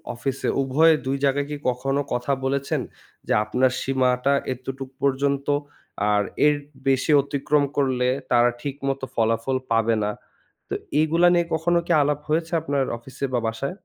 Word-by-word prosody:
অফিসে 135 Hz, +2 st, -2 dB
উভয়ে 155 Hz, +5 st, +4 dB
২ 135 Hz, +1 st, 0 dB
জায়গায় 140 Hz, +1 st, +1 dB
কি 145 Hz, -, -3 dB
কখনো 135 Hz, +3 st, -1 dB
কথা 125 Hz, +3 st, -1 dB
বলেছেন? 140 Hz, +1 st, -1 dB, 0.5 s
যে -, -, +2 dB
আপনার 125 Hz, +4 st, +2 dB
সীমাটা 130 Hz, 0 st, +1 dB, 0.2 s
এতটুক 130 Hz, +1 st, -7 dB
পর্যন্ত 140 Hz, 0 st, 0 dB, 0.7 s
আর 105 Hz, -, +3 dB, 0.2 s
এর 150 Hz, 0 st, +5 dB, 0.3 s
বেশি 135 Hz, +3 st, +2 dB
অতিক্রম 145 Hz, +1 st, 0 dB
করলে 130 Hz, -3 st, +1 dB, 0.2 s
তারা 120 Hz, 0 st, +5 dB
ঠিকমতো 135 Hz, -1 st, -3 dB
ফলাফল 115 Hz, +3 st, +1 dB
পাবে 115 Hz, 0 st, +3 dB
না। 105 Hz, -, 0 dB, 0.6 s
তো -, -, -2 dB, 0.3 s
এগুলা 165 Hz, +3 st, +3 dB
নিয়ে 170 Hz, -1 st, +3 dB
কখনো 170 Hz, +2 st, +2 dB
কি -, -, -1 dB
আলাপ 145 Hz, 0 st, 0 dB
হয়েছে 165 Hz, +2 st, 0 dB
আপনার 140 Hz, -1 st, 0 dB
অফিসে 130 Hz, +3 st, -6 dB
বা 120 Hz, -, +2 dB
বাসায়? 125 Hz, +7 st, -3 dB
135 Hz, 145 wpm, -23 LUFS, 125-145 Hz, 0.7 s, এর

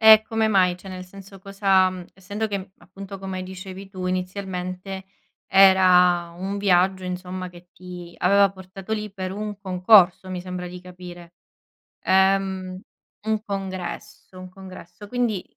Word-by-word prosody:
E 220 Hz, -1 st, +9 dB
come 220 Hz, 0 st, 0 dB
mai? 185 Hz, -4 st, +3 dB
Cioè 185 Hz, +2 st, -12 dB
nel 185 Hz, -1 st, -7 dB
senso 195 Hz, +1 st, -13 dB
cosa 195 Hz, -1 st, +3 dB
mhmm, 185 Hz, -1 st, -8 dB
essendo 200 Hz, +3 st, -4 dB
che, 200 Hz, -2 st, -2 dB
mhmm, 190 Hz, -, -8 dB
appunto 195 Hz, +2 st, -10 dB
come 190 Hz, -1 st, -5 dB
dicevi 190 Hz, +1 st, -9 dB
tu, 185 Hz, -2 st, -6 dB
inizialmente 185 Hz, 0 st, -4 dB, 0.4 s
era 180 Hz, -3 st, +5 dB
un 195 Hz, +3 st, -4 dB
viaggio, 190 Hz, -1 st, +2 dB
insomma, 185 Hz, 0 st, -5 dB
che 175 Hz, 0 st, -16 dB
ti 180 Hz, -1 st, -10 dB
aveva 200 Hz, +2 st, +5 dB
portato 190 Hz, +2 st, -9 dB
lì 210 Hz, -1 st, -2 dB
per 185 Hz, -2 st, -5 dB
un 210 Hz, 0 st, -5 dB
concorso, 185 Hz, -1 st, +4 dB
mi 185 Hz, -1 st, -4 dB
sembra 180 Hz, 0 st, -6 dB
di 180 Hz, 0 st, -9 dB
capire. 175 Hz, -1 st, -11 dB, 0.7 s
Ehm, 190 Hz, -1 st, +2 dB, 0.5 s
un 215 Hz, -1 st, 0 dB
congresso, 190 Hz, -2 st, -6 dB
un 185 Hz, 0 st, -9 dB
congresso, 190 Hz, +1 st, -12 dB
quindi 230 Hz, -4 st, -1 dB
190 Hz, 145 wpm, -23 LUFS, 180-195 Hz, 0.7 s, E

